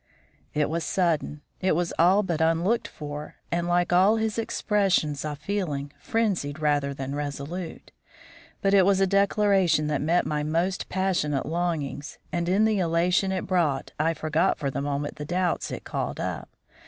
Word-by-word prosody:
It 150 Hz, -1 st, +2 dB
was 165 Hz, +1 st, -2 dB
sudden, 155 Hz, -5 st, 0 dB, 0.2 s
it 185 Hz, -3 st, +2 dB
was 175 Hz, 0 st, -1 dB
all 185 Hz, +5 st, +5 dB
but 170 Hz, -5 st, -2 dB
unlooked 170 Hz, +8 st, +2 dB
for, 150 Hz, 0 st, -7 dB, 0.2 s
and 170 Hz, 0 st, 0 dB
like 175 Hz, 0 st, +2 dB
all 190 Hz, +5 st, +5 dB
his 220 Hz, 0 st, -1 dB
expressions 195 Hz, -10 st, +1 dB
of 150 Hz, -1 st, -4 dB
feeling, 150 Hz, -5 st, -3 dB
frenzied 195 Hz, -11 st, -1 dB
rather 145 Hz, -2 st, +1 dB
than 135 Hz, 0 st, -5 dB
resolute. 145 Hz, +4 st, -5 dB, 0.7 s
But 195 Hz, 0 st, +3 dB
it 195 Hz, -1 st, +7 dB
was 195 Hz, 0 st, +3 dB
a 195 Hz, -, +4 dB
declaration 195 Hz, -4 st, +3 dB
that 150 Hz, -2 st, 0 dB
met 165 Hz, +4 st, +2 dB
my 150 Hz, -1 st, -1 dB
most 170 Hz, +5 st, -1 dB
passionate 180 Hz, -7 st, 0 dB
longings, 160 Hz, -4 st, -3 dB
and 170 Hz, 0 st, -1 dB
in 200 Hz, +4 st, +4 dB
the 215 Hz, -2 st, +2 dB
elation 180 Hz, +3 st, +2 dB
it 185 Hz, -1 st, -2 dB
brought 165 Hz, -8 st, 0 dB
I 165 Hz, +2 st, +2 dB
forgot 160 Hz, +4 st, +1 dB
for 140 Hz, -3 st, -2 dB
the 140 Hz, -, -3 dB
moment 145 Hz, 0 st, -3 dB
the 150 Hz, -, -5 dB
doubts 175 Hz, +3 st, -1 dB
it -, -, -6 dB
called -, -, -3 dB
up. -, -, -4 dB
170 Hz, 165 wpm, -26 LUFS, 150-190 Hz, 0.7 s, it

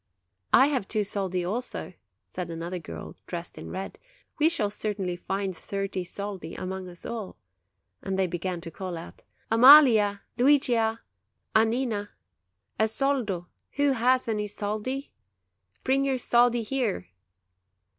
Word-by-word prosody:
"I 265 Hz, -, +7 dB
have 265 Hz, -9 st, 0 dB
two 215 Hz, -2 st, 0 dB
soldi, 190 Hz, -3 st, -2 dB
also," 220 Hz, -1 st, -4 dB, 0.3 s
said 180 Hz, -2 st, -6 dB
another 170 Hz, +2 st, -4 dB
girl, 80 Hz, -, -8 dB
dressed 175 Hz, 0 st, -6 dB
in -, -, -8 dB
red; 190 Hz, +1 st, -6 dB, 0.4 s
"we 310 Hz, +2 st, +5 dB
shall 215 Hz, -12 st, 0 dB
certainly 195 Hz, -4 st, -2 dB
find 195 Hz, +1 st, -3 dB
thirty 195 Hz, 0 st, -3 dB
soldi 190 Hz, -3 st, -6 dB
among 185 Hz, 0 st, -5 dB
us 175 Hz, -1 st, -10 dB
all"; 220 Hz, -, -5 dB, 0.6 s
and 195 Hz, -, -3 dB
then -, -, +1 dB
they 190 Hz, 0 st, +2 dB
began 175 Hz, 0 st, -3 dB
to 165 Hz, -1 st, -8 dB
call 180 Hz, +1 st, -5 dB
out: 165 Hz, -, -10 dB, 0.3 s
"Amalia! 230 Hz, -5 st, +8 dB, 0.2 s
Luigia! 240 Hz, -5 st, +3 dB, 0.5 s
Annina! 220 Hz, -2 st, +1 dB, 0.7 s
A 220 Hz, -, +4 dB
soldo. 225 Hz, -7 st, 0 dB, 0.3 s
Who 285 Hz, 0 st, +2 dB
has 255 Hz, 0 st, +2 dB
any 210 Hz, -2 st, -1 dB
soldi? 215 Hz, +7 st, -3 dB, 0.7 s
Bring 270 Hz, +1 st, +2 dB
your 270 Hz, -1 st, +1 dB
soldi 240 Hz, -1 st, +3 dB
here!" 225 Hz, -, -1 dB
205 Hz, 135 wpm, -27 LUFS, 185-245 Hz, 0.7 s, Amalia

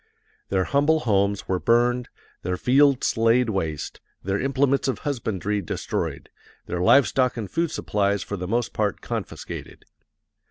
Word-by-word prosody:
Their 95 Hz, -1 st, +1 dB
humble 145 Hz, -, +2 dB
homes 100 Hz, -4 st, +1 dB
were 95 Hz, -1 st, 0 dB
burned, 120 Hz, +3 st, +2 dB, 0.3 s
their 90 Hz, +1 st, -2 dB
fields 135 Hz, +2 st, +3 dB
laid 115 Hz, +1 st, +3 dB
waste, 80 Hz, -7 st, -3 dB, 0.2 s
their 95 Hz, +1 st, -1 dB
implements 135 Hz, 0 st, +1 dB
of 130 Hz, -, 0 dB
husbandry 105 Hz, -7 st, -2 dB
destroyed, 85 Hz, -, -4 dB, 0.3 s
their 90 Hz, 0 st, -3 dB
live 135 Hz, +9 st, +6 dB
stock 130 Hz, -2 st, +1 dB
and 110 Hz, -3 st, -3 dB
food 165 Hz, -, -1 dB
supplies 100 Hz, -7 st, 0 dB
for 100 Hz, -, -5 dB
the 90 Hz, -2 st, -5 dB
most 120 Hz, +4 st, -1 dB
part 105 Hz, -3 st, -1 dB
confiscated. -, -, -6 dB
115 Hz, 145 wpm, -24 LUFS, 100-130 Hz, 0.3 s, live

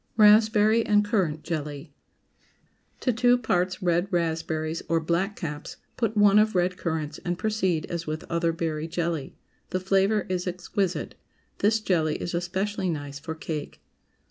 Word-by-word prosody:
RASPBERRY 215 Hz, +1 st, +6 dB
AND 210 Hz, -1 st, +4 dB
CURRANT 185 Hz, -8 st, 0 dB
JELLY. 150 Hz, -2 st, -5 dB, 1.0 s
✠ -, -, -35 dB
To 250 Hz, -, +1 dB
two 245 Hz, +2 st, +4 dB
parts 185 Hz, -5 st, 0 dB
red 175 Hz, +1 st, +2 dB
raspberries 160 Hz, -2 st, -1 dB
or 165 Hz, 0 st, +3 dB
"Blackcaps," 170 Hz, -2 st, -3 dB, 0.2 s
put 225 Hz, -2 st, -1 dB
one 205 Hz, 0 st, +6 dB
of 215 Hz, -1 st, +2 dB
red 180 Hz, 0 st, +2 dB
currants, 160 Hz, -4 st, -3 dB
and 175 Hz, 0 st, -3 dB
proceed 190 Hz, -7 st, 0 dB
as 170 Hz, -1 st, -5 dB
with 155 Hz, +1 st, -3 dB
other 170 Hz, 0 st, 0 dB
berry 160 Hz, -1 st, -3 dB
jelly. 165 Hz, -4 st, -3 dB, 0.3 s
The 185 Hz, -, -1 dB
flavor 195 Hz, +2 st, +2 dB
is 180 Hz, 0 st, -2 dB
exquisite. 180 Hz, +1 st, -2 dB, 0.5 s
This 215 Hz, +2 st, +3 dB
jelly 160 Hz, -7 st, +1 dB
is 175 Hz, -, -4 dB
especially 190 Hz, +3 st, -1 dB
nice 145 Hz, -3 st, -4 dB
for 160 Hz, +2 st, -6 dB
cake. 155 Hz, -2 st, -5 dB
175 Hz, 145 wpm, -26 LUFS, 160-205 Hz, 1.0 s, RASPBERRY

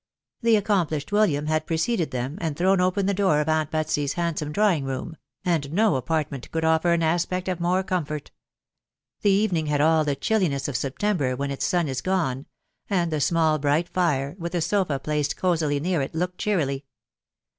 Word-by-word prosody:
The 230 Hz, -1 st, +4 dB
accomplished 185 Hz, -7 st, 0 dB
William 190 Hz, -9 st, +2 dB
had 155 Hz, 0 st, 0 dB
preceded 165 Hz, -, 0 dB
them, 130 Hz, +6 st, -4 dB
and 160 Hz, -3 st, -2 dB
thrown 185 Hz, +1 st, +3 dB
open 185 Hz, +2 st, +1 dB
the 200 Hz, -, +1 dB
door 190 Hz, -6 st, +2 dB
of 150 Hz, -, -1 dB
aunt 155 Hz, -1 st, +1 dB
Betsy's 155 Hz, -2 st, -1 dB
handsome 165 Hz, -3 st, -2 dB
drawing 190 Hz, -5 st, +2 dB
room; 135 Hz, +4 st, -4 dB, 0.3 s
and 160 Hz, -6 st, 0 dB
no 210 Hz, +2 st, +3 dB
apartment 140 Hz, -1 st, -2 dB
could 160 Hz, 0 st, -1 dB
offer 160 Hz, +2 st, +3 dB
an 170 Hz, -1 st, +2 dB
aspect 175 Hz, +3 st, 0 dB
of 180 Hz, -2 st, -2 dB
more 180 Hz, +2 st, +1 dB
comfort. 155 Hz, -6 st, -3 dB, 0.9 s
The 205 Hz, -, +3 dB
evening 195 Hz, -6 st, +2 dB
had 150 Hz, -1 st, +1 dB
all 160 Hz, +1 st, +4 dB
the 145 Hz, -2 st, 0 dB
chilliness 175 Hz, -9 st, 0 dB
of 145 Hz, -, -4 dB
September 140 Hz, +1 st, 0 dB
when 140 Hz, +2 st, -3 dB
its 140 Hz, -, -2 dB
sun 175 Hz, -3 st, +1 dB
is 130 Hz, -2 st, -3 dB
gone; 155 Hz, -8 st, -1 dB, 0.4 s
and 175 Hz, -4 st, +1 dB
the 155 Hz, -2 st, -1 dB
small 160 Hz, -1 st, +2 dB
bright 150 Hz, +4 st, +1 dB
fire, 145 Hz, -5 st, 0 dB
with 170 Hz, +1 st, -4 dB
a 175 Hz, -, +1 dB
sofa 180 Hz, -5 st, +1 dB
placed 150 Hz, +1 st, -2 dB
cosily 160 Hz, -6 st, +1 dB
near 170 Hz, 0 st, 0 dB
it, 135 Hz, -, -4 dB
looked 180 Hz, +2 st, -2 dB
cheerily. 145 Hz, -9 st, -1 dB
160 Hz, 185 wpm, -24 LUFS, 145-185 Hz, 0.9 s, The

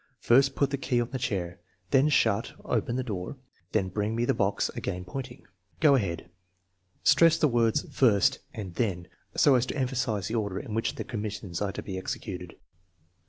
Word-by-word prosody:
First, 135 Hz, +3 st, +4 dB
put 140 Hz, -1 st, +1 dB
the 140 Hz, -, -2 dB
key 125 Hz, -2 st, +1 dB
on 120 Hz, 0 st, -2 dB
the 130 Hz, -, -3 dB
chair* 95 Hz, -9 st, -2 dB, 0.3 s
then 135 Hz, +2 st, +5 dB
shut 115 Hz, -6 st, +2 dB
(open) 120 Hz, 0 st, 0 dB
the 130 Hz, -, -1 dB
door, 100 Hz, +1 st, -5 dB, 0.3 s
then 95 Hz, -4 st, +1 dB
bring 105 Hz, +3 st, -1 dB
me 120 Hz, +1 st, +1 dB
the -, -, +2 dB
box 100 Hz, 0 st, 0 dB
(again 90 Hz, 0 st, -4 dB
pointing). 130 Hz, +7 st, -7 dB, 0.3 s
Go 150 Hz, -3 st, +6 dB
ahead." 95 Hz, -12 st, 0 dB, 0.8 s
Stress 165 Hz, -1 st, +6 dB
the 150 Hz, -, +3 dB
words 115 Hz, -3 st, +2 dB
first 105 Hz, -7 st, +4 dB
and 95 Hz, -5 st, -7 dB
then 90 Hz, -5 st, -1 dB, 0.3 s
so 145 Hz, -, +6 dB
as 125 Hz, -1 st, +3 dB
to -, -, -4 dB
emphasize 125 Hz, -6 st, -1 dB
the -, -, -4 dB
order 100 Hz, -5 st, -1 dB
in 110 Hz, -, -7 dB
which 115 Hz, +1 st, -1 dB
the -, -, -4 dB
commis 105 Hz, -2 st, -4 dB
sions 90 Hz, -4 st, -6 dB
are 100 Hz, -1 st, 0 dB
to -, -, -6 dB
be 95 Hz, -2 st, -4 dB
executed. 90 Hz, -2 st, -6 dB
115 Hz, 190 wpm, -28 LUFS, 95-130 Hz, 0.8 s, Go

